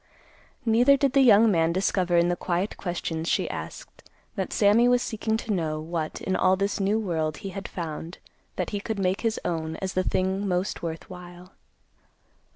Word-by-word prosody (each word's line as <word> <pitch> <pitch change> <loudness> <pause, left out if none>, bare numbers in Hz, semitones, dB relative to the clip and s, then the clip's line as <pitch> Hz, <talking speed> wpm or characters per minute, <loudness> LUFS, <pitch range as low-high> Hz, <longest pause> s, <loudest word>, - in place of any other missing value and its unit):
Neither 245 +5 +5
did 275 -2 +1
the 275 - +5
young 225 -3 +6
man 165 -2 +2
discover 180 -1 +1
in 170 0 +4
the 175 - +1
quiet 180 +3 -2
questions 170 -2 -3
she - - +1
asked - - -9 0.3
that - - -3
Sammy 215 +3 +4
was 245 0 +3
seeking 220 0 -1
to 220 -1 -3
know 155 -4 -1
what 160 0 -4
in 190 - -1
all 185 +1 +3
this 200 +2 -1
new 200 +2 +1
world 160 -7 -2
he - - -2
had 195 +1 -6
found 165 0 -6 0.4
that - - -3
he 205 - -2
could 220 +1 -4
make 190 0 0
his 225 -1 0
own 160 -2 -2
as 190 -1 -4
the 185 - +1
thing 190 +2 -1
most 185 +1 -1
worth 165 -1 -5
while. 180 0 -11
185 Hz, 185 wpm, -26 LUFS, 170-210 Hz, 0.4 s, young